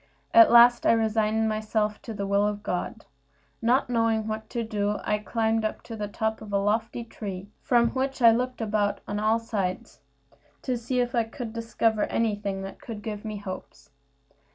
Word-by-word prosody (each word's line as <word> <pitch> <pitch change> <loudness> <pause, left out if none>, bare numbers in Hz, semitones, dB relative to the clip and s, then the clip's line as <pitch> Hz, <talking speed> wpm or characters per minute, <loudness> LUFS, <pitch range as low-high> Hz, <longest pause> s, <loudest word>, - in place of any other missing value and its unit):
At 340 -2 +8
last 240 0 +7
I - - +6
resigned 220 0 +1
myself 215 -1 -1
to 225 - -7
the 200 -1 -3
will 200 +1 +2
of 205 0 -4
God. 180 - -4 0.6
Not 245 +4 +2
knowing 225 -2 +1
what 220 0 -5
to 235 -2 -2
do, 210 -1 -1
I 210 - 0
climbed 225 +1 0
up 215 - -3
to 230 - -8
the 210 -1 -4
top 220 +1 -2
of 215 - -9
a 200 - +2
lofty 215 +4 -1
tree, 200 -4 -7
from 235 -2 +3
which 270 +2 -2
I 230 -2 +7
looked 250 +1 -1
about 210 -2 0
on 205 0 -2
all 215 +2 +3
sides, 205 -5 -4 0.6
to 255 - -1
see 245 +2 -1
if 245 +1 -2
I 235 -2 +2
could 225 0 -7
discover 225 -1 0
anything 205 -3 -1
that 195 - -9
could 215 -3 -8
give 210 -2 -5
me 215 -1 -5
hopes. 185 -8 -9
220 Hz, 185 wpm, -26 LUFS, 210-230 Hz, 0.6 s, At